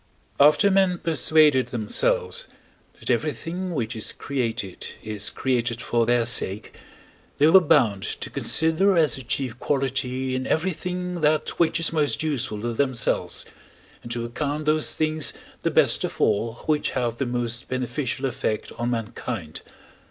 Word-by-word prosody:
After 150 Hz, +8 st, +6 dB
men 190 Hz, -2 st, +3 dB
persuaded 155 Hz, -4 st, +3 dB
themselves, 475 Hz, -, -1 dB, 0.5 s
that -, -, -2 dB
everything 180 Hz, +1 st, -2 dB
which 120 Hz, -3 st, -2 dB
is 110 Hz, -, -3 dB
created 115 Hz, -8 st, -3 dB, 0.2 s
is 105 Hz, -1 st, -2 dB
created 120 Hz, -3 st, -1 dB
for 120 Hz, -1 st, 0 dB
their 120 Hz, -1 st, +3 dB
sake, 105 Hz, -3 st, 0 dB, 0.6 s
they 145 Hz, -, +4 dB
were 165 Hz, +5 st, +8 dB
bound 120 Hz, -, +3 dB, 0.2 s
to -, -, -6 dB
consider 170 Hz, +4 st, +2 dB
as 155 Hz, -7 st, +4 dB
the 135 Hz, -, -6 dB
chief 125 Hz, -1 st, -2 dB
quality 130 Hz, -2 st, -1 dB
in 130 Hz, 0 st, -2 dB
everything 180 Hz, +1 st, -2 dB
that 155 Hz, 0 st, +2 dB
which 170 Hz, 0 st, +2 dB
is 165 Hz, -, +1 dB
most 150 Hz, -1 st, 0 dB
useful 130 Hz, -9 st, -2 dB
to 120 Hz, +1 st, -2 dB
themselves, 130 Hz, -2 st, -1 dB, 0.6 s
and 120 Hz, -, -8 dB
to 120 Hz, 0 st, -2 dB
account 145 Hz, +5 st, -3 dB
those 155 Hz, 0 st, +2 dB
things 155 Hz, -1 st, +1 dB, 0.3 s
the -, -, +1 dB
best -, -, +4 dB
of -, -, -4 dB
all 115 Hz, +3 st, +1 dB
which 150 Hz, -1 st, +1 dB
have 120 Hz, -2 st, -1 dB
the 135 Hz, -, -2 dB
most 120 Hz, 0 st, -2 dB
beneficial 130 Hz, +1 st, -2 dB
effect 110 Hz, -4 st, -2 dB
on 120 Hz, +1 st, -1 dB
mankind. 115 Hz, -7 st, -4 dB
130 Hz, 145 wpm, -24 LUFS, 120-155 Hz, 0.6 s, were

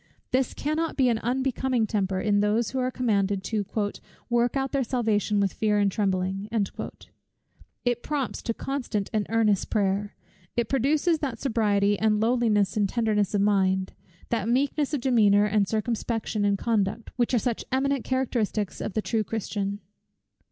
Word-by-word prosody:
This 255 Hz, -1 st, +1 dB
cannot 310 Hz, +2 st, -2 dB
be 260 Hz, -3 st, +4 dB
an 230 Hz, -2 st, +1 dB
unbecoming 255 Hz, 0 st, 0 dB
temper, 195 Hz, -3 st, -1 dB
in 205 Hz, 0 st, +2 dB
those 210 Hz, +2 st, +1 dB
who 265 Hz, -, -2 dB
are 255 Hz, 0 st, +1 dB
commanded 200 Hz, -6 st, 0 dB
to 215 Hz, -1 st, -1 dB, 0.7 s
"work 240 Hz, +2 st, +2 dB
out 270 Hz, 0 st, -1 dB
their 275 Hz, -2 st, +1 dB
salvation 220 Hz, -4 st, 0 dB
with 200 Hz, -2 st, +1 dB
fear 210 Hz, -1 st, +1 dB
and 200 Hz, -1 st, +2 dB
trembling." 195 Hz, 0 st, -1 dB, 1.4 s
It 245 Hz, -1 st, +1 dB
prompts 285 Hz, -4 st, -3 dB
to 230 Hz, -, -2 dB
constant 245 Hz, -7 st, -3 dB
and 210 Hz, -2 st, 0 dB
earnest 215 Hz, -3 st, +2 dB
prayer. 205 Hz, -1 st, 0 dB, 0.4 s
It 235 Hz, -2 st, +1 dB
produces 295 Hz, +5 st, +2 dB
that 265 Hz, -6 st, -3 dB
sobriety, 205 Hz, -5 st, +1 dB
and 215 Hz, -1 st, +2 dB
lowliness 220 Hz, -4 st, +2 dB
and 205 Hz, -2 st, +1 dB
tenderness 215 Hz, -3 st, +1 dB
of 200 Hz, -, +2 dB
mind, 190 Hz, -2 st, +2 dB, 0.4 s
that 225 Hz, -2 st, -1 dB
meekness 280 Hz, +3 st, +1 dB
of 275 Hz, -, -3 dB
demeanor 210 Hz, -5 st, +4 dB
and 210 Hz, -1 st, +2 dB
circumspection 220 Hz, -1 st, -1 dB
in 200 Hz, -1 st, +2 dB
conduct, 215 Hz, 0 st, -1 dB
which 245 Hz, 0 st, +1 dB
are -, -, +4 dB
such 235 Hz, 0 st, -1 dB
eminent 275 Hz, 0 st, +1 dB
characteristics 235 Hz, -6 st, -1 dB
of -, -, -4 dB
the 215 Hz, -, 0 dB
true 225 Hz, -2 st, 0 dB
Christian. 205 Hz, -1 st, -3 dB
220 Hz, 160 wpm, -26 LUFS, 205-250 Hz, 1.4 s, be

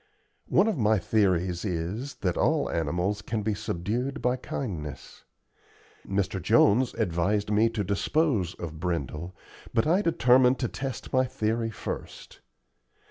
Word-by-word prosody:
One -, -, +4 dB
of 215 Hz, -10 st, 0 dB
my 110 Hz, 0 st, +3 dB
theories 90 Hz, -4 st, +1 dB
is, 100 Hz, +8 st, -3 dB
that 90 Hz, -4 st, 0 dB
all -, -, +1 dB
animals 90 Hz, +6 st, -1 dB
can 110 Hz, +1 st, -3 dB
be 110 Hz, +1 st, 0 dB
subdued 110 Hz, +7 st, -3 dB
by 125 Hz, 0 st, +1 dB
kindness. 80 Hz, -, -6 dB, 0.8 s
Mr. 95 Hz, -1 st, -1 dB
Jones 120 Hz, +9 st, +4 dB
advised 100 Hz, +2 st, 0 dB
me 110 Hz, +2 st, +4 dB
to 115 Hz, -2 st, -2 dB
dispose 100 Hz, -, 0 dB
of 80 Hz, -2 st, -7 dB
Brindle, 85 Hz, 0 st, -3 dB, 0.4 s
but 115 Hz, -, +3 dB
I 175 Hz, +6 st, +3 dB
determined 130 Hz, -, +4 dB
to 125 Hz, -, -1 dB
test 135 Hz, 0 st, -6 dB
my 130 Hz, 0 st, +4 dB
theory 115 Hz, -1 st, -1 dB
first. 110 Hz, -, -7 dB
105 Hz, 135 wpm, -27 LUFS, 90-125 Hz, 0.8 s, One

